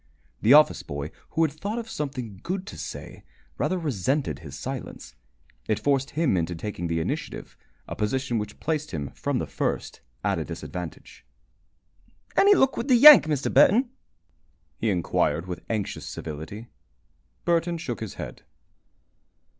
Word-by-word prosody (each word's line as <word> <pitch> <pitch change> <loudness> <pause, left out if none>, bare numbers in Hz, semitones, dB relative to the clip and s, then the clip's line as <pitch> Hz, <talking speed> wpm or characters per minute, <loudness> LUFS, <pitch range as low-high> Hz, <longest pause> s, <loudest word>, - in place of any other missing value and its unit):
The 115 +5 +6
office 150 0 +5
boy, 70 +2 -5 0.3
who 165 - +5
had 155 - +2
thought 200 +9 -4
of 230 -1 -4
something 130 - -5
good 185 +1 -3
to - - -9
say, - - -8 0.4
rather 185 - +1
resented 140 - -1
his 70 -5 -9
silence. - - -6 0.5
It 110 - +1
forced 135 -1 +1
him 160 - +3
into 85 0 -1
taking 85 0 -4
the 80 0 0
initiative, 80 - -4 0.3
a - - -5
position 120 +2 -1
which 105 0 -6
placed 155 -2 -2
him 70 -3 -4
from - - -2
the - - -1
first - - -3 0.2
at - - +1
a - - -1
disadvantage. 90 -3 -8 1.1
"Any 405 +1 +6
luck 265 -6 +3
with 235 - -2
the 260 - +5
Yank, 295 - +10
Mr. 150 -3 -1
Burton?" 240 +5 +5 0.8
he 110 - -1
inquired, 85 -2 +1
with 90 -1 -6
anxious 110 -3 -3
civility. 80 +8 -7 0.8
Burton 170 0 +1
shook 125 -7 -5
his 110 -3 -6
head. - - -7
130 Hz, 150 wpm, -26 LUFS, -, 1.1 s, Yank